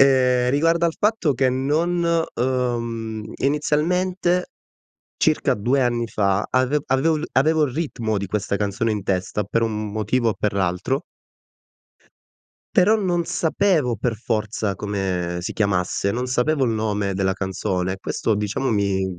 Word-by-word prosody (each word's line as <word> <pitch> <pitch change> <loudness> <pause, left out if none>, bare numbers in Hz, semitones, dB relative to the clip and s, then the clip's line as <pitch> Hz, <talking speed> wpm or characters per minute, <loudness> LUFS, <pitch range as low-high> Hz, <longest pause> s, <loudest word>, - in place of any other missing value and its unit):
Ehm, 125 -2 +4
riguardo 165 +4 +2
al 165 - -1
fatto 205 - +2
che 130 +1 +2
non 155 +7 0 0.3
uhm, 115 -3 -2
inizialmente, 175 +5 +1 0.7
circa - - +2
2 125 +7 +1
anni 120 -2 +1
fa, 100 -1 +1
ave 130 +3 +2
avevo 145 +4 +2
il 155 - -4
avevo 155 +3 +3
il 130 - -3
ritmo 120 -8 -2
di 100 - -3
questa 100 0 -1
canzone 105 +3 -1
in 105 -2 -2
testa 95 +2 -1
per 115 +4 0
un 105 -2 -2
motivo 110 +2 +1
o - - -3
per 105 -1 -1
l'altro. 95 - -1 1.7
Però 210 +1 +5
non 175 -4 0
sapevo 165 - +1
per 115 +2 -1
forza 110 -3 -2
come 95 -4 -2
si 85 - -4
chiamasse, 100 -1 0
non 125 +2 -2
sapevo 135 +3 +1
il 115 - +1
nome 105 -3 -1
della 95 0 +1
canzone. 95 -1 -2
Questo 105 +2 -1
diciamo 105 +6 -1
mi 100 -2 +1
120 Hz, 145 wpm, -22 LUFS, 100-150 Hz, 1.7 s, Però